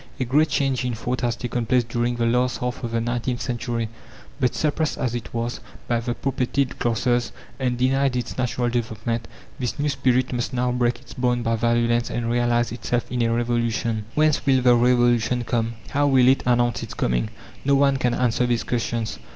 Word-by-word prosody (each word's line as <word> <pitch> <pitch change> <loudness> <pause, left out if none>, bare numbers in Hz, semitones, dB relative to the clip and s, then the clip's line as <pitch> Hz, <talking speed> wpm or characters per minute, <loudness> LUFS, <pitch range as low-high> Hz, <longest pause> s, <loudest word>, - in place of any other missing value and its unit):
A 130 - 0
great 150 +6 +3
change 135 -3 0
in 125 -2 -1
thought 125 +3 -3
has 120 -1 0
taken 120 -1 -3
place 125 0 +3
during 120 +1 -1
the 120 -1 0
last 125 +2 +1
half 125 +1 -4
of 120 - -2
the 115 0 0
nineteenth 120 +1 -2
century; 120 -2 -2 0.5
but 125 -2 +1
suppressed, 155 0 0
as 120 -2 -1
it 120 - -5
was, 120 +1 -3 0.3
by 120 -1 +1
the 120 +1 -3
propertied 135 0 -1
classes, 120 +1 +1 0.3
and 125 -2 0
denied 135 +1 +2
its 125 - -3
natural 125 -1 -1
development, 115 -1 -2 0.3
this 125 -2 -2
new 145 0 0
spirit 130 -2 +1
must 120 0 -2
now 125 0 +1
break 125 -1 +1
its - - -13
bonds 125 -1 0
by 115 0 +2
violence 120 +1 +1
and 115 -1 -2
realize 120 0 +1
itself 120 0 -2
in 125 -1 -1
a 115 0 +2
revolution. 115 -2 0
Whence 155 -1 +3
will 130 -2 +3
the 125 -1 +6
revolution 120 0 +3
come? 115 -1 -1 0.2
how 145 +1 +2
will 130 -3 +5
it 135 +1 +4
announce 120 -3 +2
its - - -7
coming? - - 0 0.3
No 140 0 +3
one 140 0 +3
can 125 -2 +1
answer 125 0 +1
these 120 -1 0
questions. 115 -2 -2
120 Hz, 195 wpm, -23 LUFS, 120-125 Hz, 0.5 s, the